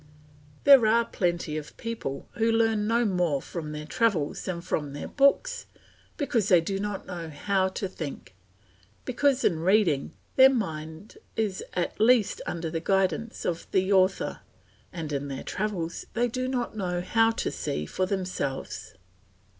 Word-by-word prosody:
There 270 Hz, -6 st, +8 dB
are 230 Hz, +2 st, +4 dB
plenty 175 Hz, -6 st, -1 dB
of 150 Hz, -1 st, -8 dB
people 225 Hz, -12 st, -5 dB
who 230 Hz, -2 st, +1 dB
learn 225 Hz, -2 st, +2 dB
no 235 Hz, +1 st, +2 dB
more 180 Hz, -8 st, +1 dB
from 155 Hz, +1 st, -6 dB
their 150 Hz, 0 st, -6 dB
travels 175 Hz, -4 st, 0 dB
than 180 Hz, -2 st, -3 dB
from 145 Hz, -4 st, -2 dB
their 145 Hz, -, -5 dB
books, 285 Hz, -, +2 dB, 0.5 s
because 240 Hz, -, 0 dB
they 180 Hz, -4 st, +6 dB
do 195 Hz, +4 st, -2 dB
not 205 Hz, -1 st, -4 dB
know 170 Hz, -3 st, -6 dB
how 190 Hz, +5 st, 0 dB
to 190 Hz, +1 st, -3 dB
think; 155 Hz, -, -7 dB, 0.7 s
because 270 Hz, +1 st, +2 dB
in 165 Hz, -4 st, +2 dB
reading 175 Hz, -5 st, +2 dB, 0.2 s
their 265 Hz, 0 st, +9 dB
mind 160 Hz, -6 st, -4 dB, 0.2 s
is 210 Hz, -4 st, -1 dB
at 180 Hz, +3 st, -2 dB
least 230 Hz, -2 st, +4 dB
under 165 Hz, -2 st, -3 dB
the 165 Hz, -, -1 dB
guidance 195 Hz, +4 st, 0 dB
of 170 Hz, -1 st, -2 dB
the 190 Hz, +1 st, +2 dB
author, 190 Hz, 0 st, +2 dB, 0.5 s
and 160 Hz, -4 st, -5 dB
in 140 Hz, 0 st, -2 dB
their 135 Hz, -1 st, -5 dB
travels 185 Hz, -5 st, -3 dB
they 240 Hz, +1 st, +2 dB
do 255 Hz, +2 st, -2 dB
not 245 Hz, -3 st, -2 dB
know 180 Hz, -4 st, -2 dB
how 225 Hz, +5 st, +3 dB
to 225 Hz, -, -2 dB
see 75 Hz, +1 st, -3 dB
for 185 Hz, -, -1 dB
themselves. 185 Hz, -, -3 dB
190 Hz, 155 wpm, -27 LUFS, 165-225 Hz, 0.7 s, their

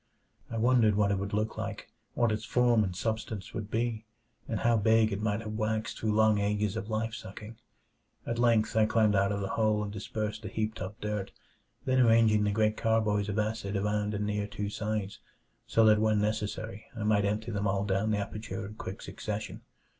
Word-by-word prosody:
I 115 Hz, -, -4 dB
wondered 115 Hz, -2 st, +4 dB
what 100 Hz, -1 st, +2 dB
it 100 Hz, -, 0 dB
would 100 Hz, +1 st, -4 dB
look 105 Hz, +1 st, -1 dB
like -, -, -5 dB, 0.2 s
what 120 Hz, -2 st, +2 dB
its 110 Hz, 0 st, -2 dB
form 120 Hz, -3 st, +3 dB
and 90 Hz, -3 st, -3 dB
substance 110 Hz, -1 st, -3 dB
would 110 Hz, -2 st, -5 dB
be, 115 Hz, 0 st, -1 dB, 0.4 s
and -, -, -2 dB
how 120 Hz, 0 st, +4 dB
big 110 Hz, 0 st, +4 dB
it 100 Hz, +1 st, -2 dB
might 105 Hz, 0 st, 0 dB
have 110 Hz, -1 st, -6 dB
waxed 110 Hz, 0 st, -2 dB
through 110 Hz, -1 st, 0 dB
long 110 Hz, -1 st, +4 dB
ages 105 Hz, 0 st, 0 dB
of 110 Hz, -1 st, -4 dB
life 110 Hz, +1 st, -1 dB
sucking. 105 Hz, +3 st, -9 dB, 0.7 s
At 115 Hz, 0 st, -2 dB
length 115 Hz, -3 st, +3 dB
I 110 Hz, -1 st, +4 dB
climbed 110 Hz, -1 st, +3 dB
out 100 Hz, +1 st, +3 dB
of 100 Hz, 0 st, -2 dB
the 95 Hz, -, -3 dB
hole 110 Hz, -1 st, +1 dB
and 105 Hz, -1 st, -5 dB
dispersed 105 Hz, +1 st, -4 dB
the 110 Hz, -, -6 dB
heaped 110 Hz, +1 st, -3 dB
up 95 Hz, +3 st, -6 dB
dirt, 105 Hz, -2 st, -3 dB, 0.5 s
then 130 Hz, 0 st, +2 dB
arranging 115 Hz, -3 st, +5 dB
the 105 Hz, -, +1 dB
great 110 Hz, +1 st, +1 dB
carboys 105 Hz, -2 st, +1 dB
of 105 Hz, -, -2 dB
acid 105 Hz, -2 st, -1 dB
around 105 Hz, +1 st, 0 dB
and 105 Hz, 0 st, -1 dB
near 105 Hz, 0 st, -1 dB
two 100 Hz, 0 st, -4 dB
sides, 105 Hz, -2 st, -3 dB, 0.5 s
so 115 Hz, -, +4 dB
that 105 Hz, 0 st, +5 dB
when 110 Hz, -1 st, +3 dB
necessary 110 Hz, 0 st, -3 dB
I 110 Hz, -, -3 dB
might 105 Hz, -1 st, +3 dB
empty 110 Hz, +3 st, -1 dB
them 100 Hz, -1 st, -1 dB
all 100 Hz, +1 st, 0 dB
down 100 Hz, +2 st, 0 dB
the 105 Hz, -, +1 dB
aperture 105 Hz, +1 st, -5 dB
in 105 Hz, -, -8 dB
quick 95 Hz, -3 st, -7 dB
succession. 105 Hz, 0 st, -5 dB
105 Hz, 205 wpm, -30 LUFS, 105-110 Hz, 0.7 s, arranging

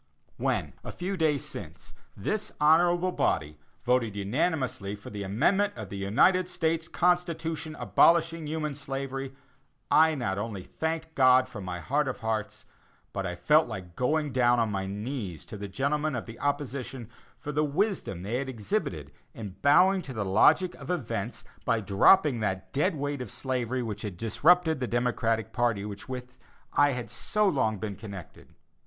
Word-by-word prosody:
When, -, -, -1 dB
a -, -, -6 dB
few 185 Hz, +3 st, -3 dB
days 155 Hz, -4 st, +1 dB
since, 90 Hz, -, -9 dB, 0.2 s
this 215 Hz, -, -2 dB
honorable 175 Hz, +4 st, +4 dB
body 75 Hz, -, -1 dB, 0.2 s
voted 120 Hz, -4 st, +1 dB
unanimously 110 Hz, -, -1 dB
for 105 Hz, -, -11 dB
the 105 Hz, -1 st, -5 dB
Amendment 155 Hz, -, +2 dB
of 110 Hz, -5 st, -7 dB
the 100 Hz, -, -6 dB
United 175 Hz, -, +3 dB
States 165 Hz, -1 st, -1 dB
Constitution 165 Hz, -3 st, 0 dB
abolishing 165 Hz, -, +3 dB
human 155 Hz, -1 st, -2 dB
slavery, 135 Hz, -1 st, -5 dB, 0.6 s
I 160 Hz, 0 st, +5 dB
not 100 Hz, -8 st, -2 dB
only 105 Hz, -3 st, -4 dB
thanked 160 Hz, -, -4 dB
God 130 Hz, -2 st, +5 dB
from 100 Hz, -5 st, -8 dB
my 90 Hz, -1 st, -4 dB
heart 145 Hz, -, 0 dB
of 130 Hz, -, -4 dB
hearts, 110 Hz, -2 st, -3 dB, 0.5 s
but -, -, -2 dB
I -, -, -4 dB
felt -, -, +4 dB
like 90 Hz, -2 st, -7 dB
going 150 Hz, +3 st, 0 dB
down 120 Hz, -1 st, +3 dB
on 115 Hz, -2 st, +1 dB
my 95 Hz, -1 st, -2 dB
knees 105 Hz, -, -5 dB
to -, -, -8 dB
the 100 Hz, 0 st, -5 dB
gentlemen 145 Hz, +8 st, -1 dB
of 120 Hz, -, -4 dB
the 115 Hz, 0 st, -10 dB
opposition 135 Hz, -4 st, -3 dB, 0.3 s
for 150 Hz, -, -6 dB
the 150 Hz, +1 st, +1 dB
wisdom 150 Hz, -, -1 dB
they 110 Hz, +5 st, -1 dB
had 135 Hz, 0 st, -3 dB
exhibited 110 Hz, -6 st, -3 dB, 0.2 s
in 100 Hz, -4 st, -7 dB
bowing 185 Hz, +7 st, +5 dB
to 135 Hz, -, -8 dB
the 110 Hz, -4 st, -2 dB
logic 140 Hz, -, +4 dB
of -, -, -9 dB
events 115 Hz, -, -3 dB, 0.2 s
by 115 Hz, -3 st, +1 dB
dropping 120 Hz, -, +4 dB
that 95 Hz, -3 st, -3 dB
dead 160 Hz, +6 st, +1 dB
weight 145 Hz, -1 st, -3 dB
of 125 Hz, -, -6 dB
slavery 130 Hz, -1 st, -2 dB
which 105 Hz, -2 st, -5 dB
had 100 Hz, -5 st, -5 dB
disrupted 160 Hz, -, +3 dB
the 125 Hz, -, -2 dB
Democratic 115 Hz, -2 st, 0 dB
party, 120 Hz, -5 st, +1 dB
with 105 Hz, +5 st, -8 dB
which 125 Hz, -1 st, -6 dB, 0.4 s
I 145 Hz, -1 st, +4 dB
had 125 Hz, -1 st, -3 dB
been -, -, -18 dB
so 210 Hz, -, 0 dB
long 110 Hz, -, +1 dB
connected. 100 Hz, -2 st, -8 dB
130 Hz, 165 wpm, -28 LUFS, 105-155 Hz, 0.6 s, I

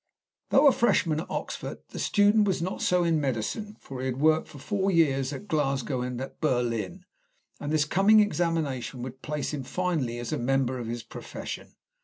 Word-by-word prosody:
Though 275 Hz, +3 st, +5 dB
a 280 Hz, -, +9 dB
freshman 170 Hz, -11 st, +2 dB
at 165 Hz, -, -6 dB
Oxford, -, -, -4 dB
the -, -, -7 dB
student 205 Hz, 0 st, +4 dB
was 190 Hz, -, +1 dB
not 180 Hz, +3 st, -3 dB
so 180 Hz, -1 st, +3 dB
in 165 Hz, -2 st, +2 dB
medicine, 145 Hz, -, -2 dB
for 135 Hz, -2 st, -8 dB
he 130 Hz, -, -2 dB
had 130 Hz, -1 st, -2 dB
worked 155 Hz, +1 st, +3 dB
for -, -, -12 dB
four 195 Hz, +7 st, -1 dB
years 140 Hz, -6 st, +2 dB
at 205 Hz, +8 st, -7 dB
Glasgow 135 Hz, -, 0 dB
and 125 Hz, -1 st, -3 dB
at 135 Hz, -, -7 dB
Berlin, 125 Hz, -, -1 dB, 0.5 s
and 145 Hz, -, -4 dB
this 155 Hz, -1 st, +3 dB
coming 195 Hz, +7 st, +5 dB
examination 160 Hz, -, 0 dB
would 130 Hz, +1 st, -8 dB
place 150 Hz, 0 st, -3 dB
him 145 Hz, -, -2 dB
finally 150 Hz, -5 st, -1 dB
as 120 Hz, -1 st, -4 dB
a -, -, -1 dB
member 130 Hz, 0 st, +1 dB
of 120 Hz, -, -5 dB
his 120 Hz, 0 st, -4 dB
profession. -, -, -8 dB
150 Hz, 190 wpm, -27 LUFS, 130-180 Hz, 0.5 s, a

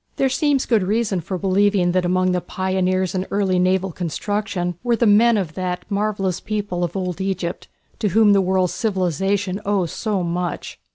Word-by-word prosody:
There 270 Hz, -, +1 dB
seems 285 Hz, -1 st, +1 dB
good 225 Hz, -4 st, +2 dB
reason 205 Hz, -1 st, 0 dB
for 185 Hz, +3 st, -4 dB
believing 195 Hz, -1 st, +2 dB
that 180 Hz, 0 st, +1 dB
among 185 Hz, +1 st, +2 dB
the 180 Hz, 0 st, 0 dB
pioneers 185 Hz, 0 st, -1 dB
in 185 Hz, 0 st, -2 dB
early 195 Hz, -2 st, +1 dB
naval 185 Hz, +1 st, +1 dB
construction 180 Hz, +2 st, -2 dB
were 240 Hz, -1 st, +1 dB
the 235 Hz, -, +1 dB
men 220 Hz, +2 st, +5 dB
of 175 Hz, -6 st, -2 dB
that 180 Hz, 0 st, -3 dB
marvellous 200 Hz, -3 st, -1 dB
people 205 Hz, -4 st, -3 dB
of 175 Hz, +2 st, -2 dB
old 180 Hz, -1 st, -3 dB
Egypt 190 Hz, -3 st, -3 dB, 0.3 s
to 215 Hz, -, +1 dB
whom 210 Hz, +1 st, +4 dB
the 195 Hz, -, +4 dB
world's 185 Hz, -1 st, +1 dB
civilization 195 Hz, -, -1 dB
owes 195 Hz, -5 st, 0 dB
so 205 Hz, -5 st, -2 dB
much. 175 Hz, +1 st, -3 dB
190 Hz, 175 wpm, -21 LUFS, 180-205 Hz, 0.3 s, men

